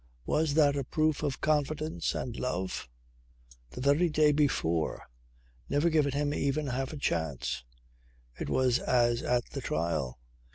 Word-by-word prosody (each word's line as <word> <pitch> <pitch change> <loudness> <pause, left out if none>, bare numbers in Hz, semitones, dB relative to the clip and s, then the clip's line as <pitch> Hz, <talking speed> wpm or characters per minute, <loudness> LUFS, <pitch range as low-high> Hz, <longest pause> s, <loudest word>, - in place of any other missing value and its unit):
Was 150 -1 +1
that 145 -3 +5
a 140 - -1
proof 155 +3 0
of 145 -3 -2
confidence 155 +1 0
and 120 -2 -4
love? 95 - -3 0.8
The 95 - -8
very 145 +6 +3
day 150 -1 +4
before! 110 - 0 0.7
Never 160 +4 +2
given 150 -3 +2
him 145 +1 0
even 145 +1 0
half 130 0 -2
a 155 - -6
chance. 80 - -2 0.8
It - - -3
was 130 -1 +2
as 120 -1 +2
at 120 -1 0
the - - -4
trial. 75 -6 -2
140 Hz, 140 wpm, -30 LUFS, 120-150 Hz, 0.8 s, that